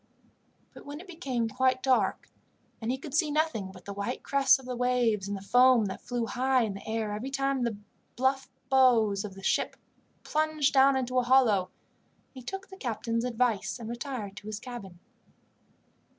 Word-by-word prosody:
But -, -, -12 dB
when 285 Hz, +1 st, -8 dB
it 365 Hz, -, -11 dB
became 275 Hz, -, -2 dB
quite 255 Hz, +2 st, +1 dB
dark, 260 Hz, -2 st, +1 dB, 0.5 s
and 225 Hz, -, -3 dB
he 260 Hz, -, -1 dB
could 275 Hz, +1 st, -9 dB
see 310 Hz, 0 st, +2 dB
nothing 295 Hz, -11 st, -1 dB
but 185 Hz, -2 st, -15 dB
the 200 Hz, -, -6 dB
white 200 Hz, +5 st, -4 dB
crests 275 Hz, -1 st, +4 dB
of 265 Hz, -, -14 dB
the 250 Hz, 0 st, -4 dB
waves 240 Hz, -5 st, +1 dB
and 200 Hz, 0 st, -3 dB
the 195 Hz, -, -10 dB
foam 245 Hz, +1 st, +5 dB
that 190 Hz, -, -5 dB
flew 245 Hz, -1 st, -2 dB
high 255 Hz, +1 st, +1 dB
in 215 Hz, -3 st, -2 dB
the 195 Hz, -, -10 dB
air 220 Hz, -1 st, -2 dB
every 225 Hz, +6 st, -4 dB
time 275 Hz, -1 st, 0 dB
the 235 Hz, -4 st, -1 dB, 0.4 s
bluff 265 Hz, +2 st, 0 dB, 0.2 s
bows 230 Hz, -7 st, +4 dB
of 200 Hz, -2 st, -7 dB
the 195 Hz, -, -12 dB
ship -, -, 0 dB, 0.5 s
plunged 310 Hz, -2 st, +1 dB
down 270 Hz, 0 st, +6 dB
into 255 Hz, 0 st, 0 dB
a -, -, +1 dB
hollow, 235 Hz, -8 st, +4 dB, 0.6 s
he 260 Hz, -, -10 dB
took 385 Hz, +10 st, -7 dB
the 380 Hz, -, -11 dB
captain's 230 Hz, -, -2 dB
advice 245 Hz, -3 st, 0 dB
and 230 Hz, -2 st, -7 dB
retired 235 Hz, -4 st, -5 dB
to 205 Hz, -, -10 dB
his 215 Hz, -1 st, -4 dB
cabin. 220 Hz, -7 st, -9 dB
250 Hz, 185 wpm, -29 LUFS, 220-265 Hz, 0.6 s, down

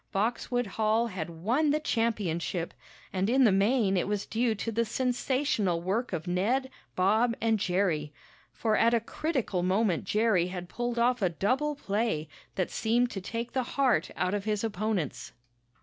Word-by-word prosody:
Boxwood 240 Hz, +4 st, 0 dB
Hall 220 Hz, +3 st, +1 dB
had 185 Hz, -8 st, -4 dB
won 225 Hz, -, 0 dB
the 300 Hz, +1 st, +2 dB
championship, 195 Hz, -, -1 dB, 0.4 s
and 190 Hz, +2 st, 0 dB
in 265 Hz, +2 st, +4 dB
the 225 Hz, -, +6 dB
main 200 Hz, +1 st, +3 dB
it 180 Hz, -, +1 dB
was 205 Hz, -1 st, -1 dB
due 230 Hz, 0 st, 0 dB
to 230 Hz, +3 st, -3 dB
the 230 Hz, +1 st, +1 dB
sensational 250 Hz, -, 0 dB
work 200 Hz, +8 st, -1 dB
of 170 Hz, -2 st, -3 dB
Ned, 230 Hz, +10 st, 0 dB, 0.2 s
Bob 220 Hz, +6 st, +3 dB
and 225 Hz, -1 st, +2 dB
Jerry. 180 Hz, -6 st, 0 dB, 0.4 s
For 220 Hz, -2 st, 0 dB
at 230 Hz, +2 st, +4 dB
a -, -, +3 dB
critical 235 Hz, -, -2 dB
moment 185 Hz, -1 st, +1 dB
Jerry 210 Hz, -5 st, +2 dB
had 180 Hz, -1 st, -6 dB
pulled 240 Hz, 0 st, -3 dB
off 245 Hz, 0 st, +2 dB
a 185 Hz, -, +3 dB
double 260 Hz, -, 0 dB
play 205 Hz, -, -1 dB, 0.3 s
that 185 Hz, -, -1 dB
seemed 240 Hz, +2 st, +1 dB
to 195 Hz, -, -5 dB
take 230 Hz, +5 st, -4 dB
the 260 Hz, -, +1 dB, 0.2 s
heart 255 Hz, -, +3 dB
out 180 Hz, +1 st, 0 dB
of 205 Hz, -1 st, -2 dB
his 210 Hz, -1 st, -1 dB
opponents. 215 Hz, -, -2 dB
215 Hz, 165 wpm, -29 LUFS, 185-240 Hz, 0.4 s, the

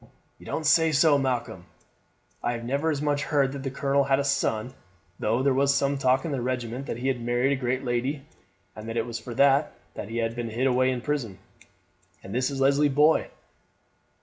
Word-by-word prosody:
"You -, -, -14 dB
don't 160 Hz, -, -3 dB
say 160 Hz, +1 st, +4 dB
so, 145 Hz, 0 st, +4 dB
Malcolm! 125 Hz, -9 st, -2 dB, 0.8 s
I 120 Hz, -, -1 dB
never 140 Hz, +7 st, -1 dB
as 150 Hz, -2 st, -1 dB
much 145 Hz, -1 st, 0 dB
heard 140 Hz, -2 st, +1 dB
that 140 Hz, 0 st, -6 dB
the 135 Hz, -, -3 dB
colonel 140 Hz, +1 st, +1 dB
had 135 Hz, 0 st, +2 dB
a 140 Hz, -, 0 dB
son, 125 Hz, -3 st, -1 dB, 0.5 s
though 115 Hz, +4 st, 0 dB
there 140 Hz, -1 st, +3 dB
was 140 Hz, +1 st, +2 dB
some 140 Hz, 0 st, 0 dB
talk 130 Hz, +1 st, +2 dB
in 165 Hz, -, -3 dB
the 135 Hz, -3 st, -2 dB
regiment 125 Hz, +1 st, -3 dB
that -, -, -4 dB
he 125 Hz, +2 st, -3 dB
had 130 Hz, -3 st, -1 dB
married 120 Hz, +3 st, +1 dB
a -, -, +2 dB
great 125 Hz, +1 st, -1 dB
lady, 130 Hz, +4 st, -2 dB, 0.5 s
and 110 Hz, +1 st, -8 dB
that 115 Hz, -, -4 dB
it 115 Hz, -, 0 dB
was 120 Hz, -1 st, -5 dB
for 120 Hz, -2 st, -8 dB
that 140 Hz, +2 st, +3 dB, 0.2 s
that 105 Hz, -, -7 dB
he 115 Hz, -, -4 dB
had 115 Hz, 0 st, -1 dB
been 120 Hz, -1 st, -4 dB
hid 120 Hz, +4 st, -1 dB
away 130 Hz, 0 st, +3 dB
in 125 Hz, -2 st, -2 dB
prison. 125 Hz, -9 st, -3 dB, 0.9 s
And 95 Hz, -, -8 dB
this 125 Hz, +2 st, 0 dB
is 140 Hz, -1 st, -5 dB
Leslie's 140 Hz, +2 st, +3 dB
boy! 150 Hz, +3 st, +3 dB
130 Hz, 210 wpm, -26 LUFS, 120-140 Hz, 0.9 s, say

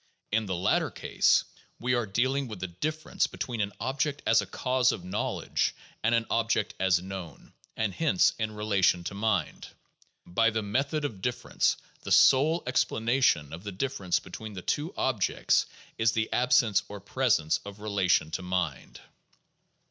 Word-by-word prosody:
In 110 Hz, 0 st, +1 dB
the 95 Hz, -, -1 dB
latter 95 Hz, +4 st, +1 dB
case, -, -, +2 dB, 0.4 s
we 125 Hz, +1 st, 0 dB
are 120 Hz, -2 st, 0 dB
dealing 130 Hz, +7 st, 0 dB
with 110 Hz, -5 st, -8 dB
the 95 Hz, -, -3 dB
difference 155 Hz, -, -2 dB
between 120 Hz, -3 st, -4 dB
an 100 Hz, 0 st, -1 dB
object 140 Hz, +2 st, -2 dB
as 115 Hz, -1 st, +4 dB
a 100 Hz, -, -7 dB
cause 125 Hz, +5 st, +1 dB
of 90 Hz, -, -6 dB
knowledge 95 Hz, +4 st, -1 dB, 0.3 s
and 115 Hz, +2 st, +3 dB
an 115 Hz, -1 st, +1 dB
object 115 Hz, 0 st, +1 dB
as 95 Hz, -2 st, +3 dB
known, 90 Hz, -6 st, -9 dB, 0.2 s
and 110 Hz, -3 st, 0 dB
hence 165 Hz, -, +3 dB
in 110 Hz, -1 st, -2 dB
relation 100 Hz, -4 st, +2 dB
to 95 Hz, -, -5 dB
mind. 105 Hz, 0 st, -1 dB, 0.6 s
By 115 Hz, +6 st, +2 dB
the 110 Hz, -1 st, -2 dB
"method 140 Hz, +8 st, -1 dB
of 105 Hz, -9 st, -5 dB
differ 120 Hz, +2 st, -3 dB
ence" -, -, +2 dB, 0.2 s
the -, -, -7 dB
sole 155 Hz, +6 st, +5 dB
explanation 115 Hz, -, +1 dB
of 85 Hz, +3 st, -8 dB
the 105 Hz, -, -5 dB
difference 100 Hz, -3 st, -1 dB
between 110 Hz, -1 st, -9 dB
the 95 Hz, -2 st, -7 dB
two 155 Hz, +4 st, -1 dB
objects 115 Hz, -7 st, +1 dB, 0.3 s
is 110 Hz, 0 st, +3 dB
the 110 Hz, 0 st, -1 dB
absence 120 Hz, -4 st, +3 dB
or 105 Hz, -, -7 dB
presence 100 Hz, -6 st, +1 dB
of 100 Hz, 0 st, -10 dB
relation 95 Hz, -6 st, +1 dB
to -, -, -3 dB
mind. 90 Hz, -6 st, -3 dB
110 Hz, 165 wpm, -28 LUFS, 95-125 Hz, 0.6 s, sole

